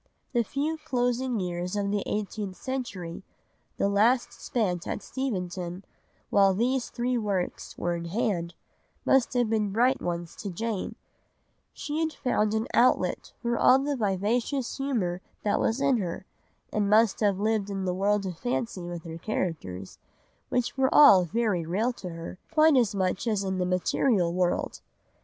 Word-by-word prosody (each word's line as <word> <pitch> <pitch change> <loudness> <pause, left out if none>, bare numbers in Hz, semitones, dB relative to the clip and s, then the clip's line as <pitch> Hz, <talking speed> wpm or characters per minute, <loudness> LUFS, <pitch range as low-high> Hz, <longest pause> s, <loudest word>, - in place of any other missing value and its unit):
The 240 -2 +3
few 300 +6 -2
closing 245 -1 0
years 180 0 -3
of 200 -1 0
the 205 -1 0
eighteenth 205 -2 -3
century, 200 -8 -5 0.6
the - - +2
last 225 +5 +3
spent 180 -8 -2
at - - -3
Steventon, 185 -7 -4 0.5
while 195 -1 +5
these 250 +4 0
three 245 0 -1
works 200 -4 -3
were 175 - -1
in 170 0 -5
hand, 175 -3 -1 0.5
must 265 -3 +3
have 245 -2 +3
been 215 -2 0
bright 250 +5 +2
ones 170 -1 -3
to 200 - -5
Jane; 215 +2 -3 0.8
she 300 +1 -4
had 320 -1 0
found 215 -5 0
an 220 +1 0
outlet 250 - +2
for 235 0 0
all 255 - +7
the 280 +1 -1
vivacious 230 +5 0
humour 220 -11 -1 0.2
that 205 - +1
was 225 +4 +1
in 275 -2 +3
her, 190 -2 -4 0.5
and 205 -1 +1
must 215 0 +4
have 205 -3 +2
lived 215 -1 0
in 195 -1 -3
the 180 - 0
world 200 +2 +1
of 180 -3 -5
fancy 240 -5 -2
with 175 -1 -6
her 165 0 -7
characters, 155 - -4 0.5
which 245 -1 0
were 265 0 +4
all 195 -11 +8
very 210 -2 0
real 205 +10 0
to 185 -6 -7
her, 165 +2 -8
quite 310 -1 +5
as 230 -5 +3
much 190 +3 -1
as 210 -3 +1
in 190 -1 -2
the 180 - 0
material 180 0 +1
world. 180 -1 0
210 Hz, 160 wpm, -27 LUFS, 180-245 Hz, 0.8 s, all